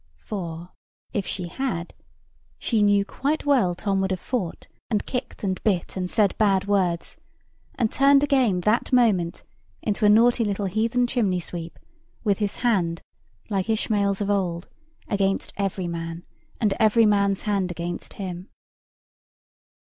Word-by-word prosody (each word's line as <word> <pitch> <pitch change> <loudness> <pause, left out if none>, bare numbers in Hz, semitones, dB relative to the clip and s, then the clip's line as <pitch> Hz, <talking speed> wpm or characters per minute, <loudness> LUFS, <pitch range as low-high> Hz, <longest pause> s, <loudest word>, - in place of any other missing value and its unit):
For, 175 -4 -6 0.4
if 200 - -2
she 180 -2 -3
had, 175 -4 -3 0.6
she 225 -3 0
knew 205 -1 +4
quite 290 +8 -2
well 245 -12 +3
Tom 195 +1 0
would 190 - 0
have 185 -1 -1
fought, 205 -8 -3 0.2
and 215 -3 0
kicked, 250 -3 -5
and 190 -2 -1
bit, 190 -6 0
and 180 -1 -2
said 210 -2 +2
bad 195 -3 +3
words, 185 -4 0 0.6
and 230 -4 0
turned 275 +1 +5
again 255 -10 +2
that 215 +9 +1
moment 210 -9 +2 0.4
into 210 +1 -1
a 210 - +6
naughty 235 +3 +5
little 205 -1 -1
heathen 225 +6 +1
chimney 210 -7 0
sweep, 170 -1 -7 0.5
with 205 -4 +1
his 205 -2 -1
hand, 175 -8 +1 0.5
like 195 0 -1
Ishmael's 205 -3 +1
of 205 0 0
old, 180 -3 -1 0.4
against 195 -2 0
every 195 -2 -2
man, 165 0 -5 0.3
and 210 -4 +2
every 220 +1 +5
man's 200 -2 +2
hand 200 -3 0
against 175 0 -5
him. 185 -1 -6
200 Hz, 145 wpm, -24 LUFS, 180-220 Hz, 0.6 s, a